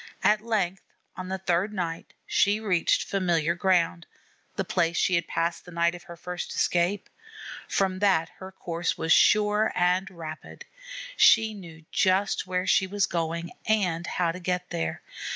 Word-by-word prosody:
At 210 0 +4
length 195 -5 -1 0.3
on 185 - -6
the 190 - -2
third 190 +2 0
night 170 -5 -5
she 205 +2 +2
reached 185 -6 +1
familiar 170 -4 +1
ground, 175 -2 +1 0.5
the - - -2
place 170 -2 0
she 185 - +2
had 170 -2 +1
passed 170 0 -2
the 180 - -13
night 170 0 +1
of 175 0 -11
her 170 -2 -10
first 180 +1 -6
escape. 180 +3 +1 0.6
From 190 -1 0
that 185 -5 +2
her 190 0 -8
course 170 -3 -3
was 160 0 +2
sure 210 +1 +4
and 180 +2 +1
rapid. 160 -4 -9 0.5
She 220 - +5
knew 165 -5 -12
just 190 0 +1
where 180 0 -1
she 190 - +3
was 200 +1 +1
going 170 0 -3 0.2
and 180 -6 +1
how 175 -2 0
to 180 - -8
get 180 0 -3
there. 80 -1 -3
180 Hz, 160 wpm, -26 LUFS, 170-195 Hz, 0.6 s, She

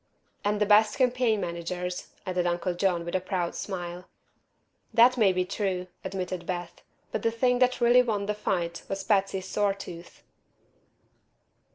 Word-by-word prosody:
"And 205 0 +1
the 210 - +3
best 210 +1 +5
campaign 250 -4 +2
managers," 180 +1 -4 0.2
added 180 -2 0
Uncle 175 +1 -1
John, 175 -1 0
with 170 - -5
a 185 - +1
proud 185 -2 -2
smile. 180 -2 -5 0.8
"That 245 +2 +6
may 215 -6 +4
be 185 0 0
true," 185 -2 -2 0.2
admitted 185 -2 -4
Beth. 175 -2 -5 0.3
"But 220 - -2
the 230 - +2
thing 245 +2 +1
that 255 0 +3
really 240 +1 +6
won 215 -5 -1
the 210 - 0
fight 175 -5 -2
was 195 0 -3
Patsy's 195 -2 +1
sore 200 -1 +1
tooth." 175 -3 -10
190 Hz, 155 wpm, -27 LUFS, 180-215 Hz, 0.8 s, That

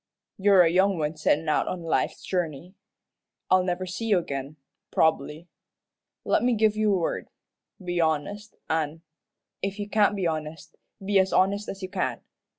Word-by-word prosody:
You're 195 -2 +6
a 165 - +3
young 190 +1 +3
one 155 0 -2
settin' 155 +1 +1
out 155 - +1
on 180 -2 -4
life's 165 - -1
journey. 175 -1 -3 0.8
I'll 185 0 +6
never 180 0 -2
see 190 +5 -5
you 205 -3 +4
agin, 140 -3 -4 0.3
prob'bly. 160 0 +1 0.8
Let - - +2
me 245 -1 +2
give 215 -1 +3
you 215 -1 +2
a - - +2
word 170 - -2 0.5
be 175 -1 -1
honest, 165 +7 -2
an' 160 0 -2 0.6
if 195 +1 -3
you 205 -1 -4
can't 210 -1 +3
be 190 -3 -2
honest, 155 -1 -4 0.3
be 200 0 +3
as 190 0 +2
honest 200 +2 +2
as 195 0 -7
you 185 - -4
can. - - -2
180 Hz, 165 wpm, -26 LUFS, 160-200 Hz, 0.8 s, You're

